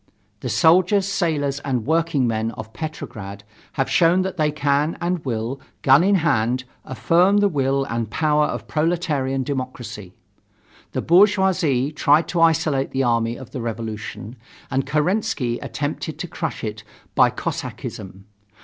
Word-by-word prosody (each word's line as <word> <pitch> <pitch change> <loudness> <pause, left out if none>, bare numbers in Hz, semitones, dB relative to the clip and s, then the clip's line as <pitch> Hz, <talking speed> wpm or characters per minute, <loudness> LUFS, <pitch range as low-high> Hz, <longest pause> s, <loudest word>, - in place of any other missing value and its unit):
The 125 - -4
soldiers, 185 - +4
sailors 155 -8 0
and 130 -6 -2
workingmen 135 -8 +1
of 110 0 -9
Petrograd 100 -10 -7 0.3
have 135 - 0
shown 175 +2 +3
that 190 0 -4
they 155 -3 +1
can 145 +1 0
and 175 -1 -2
will, 120 +1 -3 0.2
gun 135 +4 +6
in 200 +2 +4
hand, 130 - +1 0.2
affirm 175 - +2
the 205 0 +4
will 135 -5 0
and 115 -4 -3
power 150 +4 +2
of - - -5
proletarian 150 -5 0
democracy. 125 -8 -6 0.8
The - - -2
bourgeoisie 180 -7 +3
tried 150 +1 +3
to 170 - 0
isolate 155 -4 +2
the 135 0 -1
army 115 -1 +1
of 130 - -11
the 130 - -5
revolution 110 0 -6 0.3
and 135 0 0
Kerensky 150 - 0
attempted 150 +1 -4
to 175 - -5
crush 165 -1 -5
it 110 0 -5 0.3
by - - +5
Cossackism. 95 0 -6
145 Hz, 140 wpm, -22 LUFS, 120-165 Hz, 0.8 s, gun